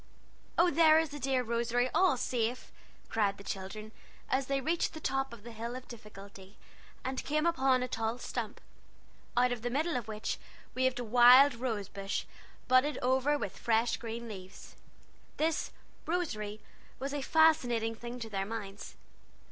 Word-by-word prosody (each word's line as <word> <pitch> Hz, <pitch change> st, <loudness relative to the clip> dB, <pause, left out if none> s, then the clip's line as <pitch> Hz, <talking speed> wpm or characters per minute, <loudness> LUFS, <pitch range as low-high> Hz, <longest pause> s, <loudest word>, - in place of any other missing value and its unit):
"Oh, 345 Hz, +1 st, +5 dB
there 315 Hz, 0 st, +6 dB
is 320 Hz, -1 st, +2 dB
the 290 Hz, +1 st, -7 dB
dear 260 Hz, -1 st, +1 dB
Rosary, 235 Hz, +1 st, 0 dB
all 370 Hz, -8 st, +4 dB
safe!" 245 Hz, 0 st, -2 dB, 0.4 s
cried 200 Hz, -3 st, 0 dB
the 200 Hz, -, -11 dB
children, 200 Hz, +3 st, -6 dB, 0.4 s
as 265 Hz, 0 st, +1 dB
they 275 Hz, 0 st, +1 dB
reached 325 Hz, +5 st, 0 dB
the 315 Hz, -, -7 dB
top 270 Hz, -2 st, -1 dB
of 235 Hz, -3 st, -11 dB
the 235 Hz, -, -9 dB
Hill 230 Hz, +2 st, -5 dB
of 255 Hz, 0 st, -8 dB
Difficulty, 200 Hz, -3 st, -12 dB, 0.5 s
and 260 Hz, 0 st, -2 dB
came 305 Hz, +2 st, 0 dB
upon 265 Hz, -6 st, +3 dB
a -, -, -2 dB
tall 225 Hz, 0 st, -2 dB
stump, 235 Hz, -3 st, -5 dB, 0.8 s
out 250 Hz, 0 st, +4 dB
of 245 Hz, -2 st, -3 dB
the 245 Hz, -, -2 dB
middle 310 Hz, +6 st, 0 dB
of 245 Hz, -3 st, -3 dB
which 215 Hz, 0 st, -3 dB, 0.3 s
waved 260 Hz, 0 st, +1 dB
a 245 Hz, -, -2 dB
wild 245 Hz, +4 st, +7 dB
rose 230 Hz, -4 st, -3 dB
bush, 195 Hz, -1 st, -3 dB, 0.4 s
budded 255 Hz, +4 st, +4 dB
over 265 Hz, +3 st, +2 dB
with 200 Hz, -7 st, -5 dB
fresh 230 Hz, 0 st, +2 dB
green 230 Hz, 0 st, -6 dB
eaves. 190 Hz, -2 st, -11 dB, 0.6 s
This 315 Hz, +1 st, 0 dB, 0.4 s
"Rosary" 215 Hz, -12 st, -2 dB, 0.4 s
was 275 Hz, +1 st, -4 dB
a 290 Hz, -, -2 dB
fascinating 260 Hz, -8 st, +3 dB
thing 240 Hz, +2 st, -7 dB
to 225 Hz, -, -5 dB
their 195 Hz, -1 st, -1 dB
minds. 205 Hz, -3 st, -7 dB
245 Hz, 165 wpm, -31 LUFS, 220-270 Hz, 0.8 s, wild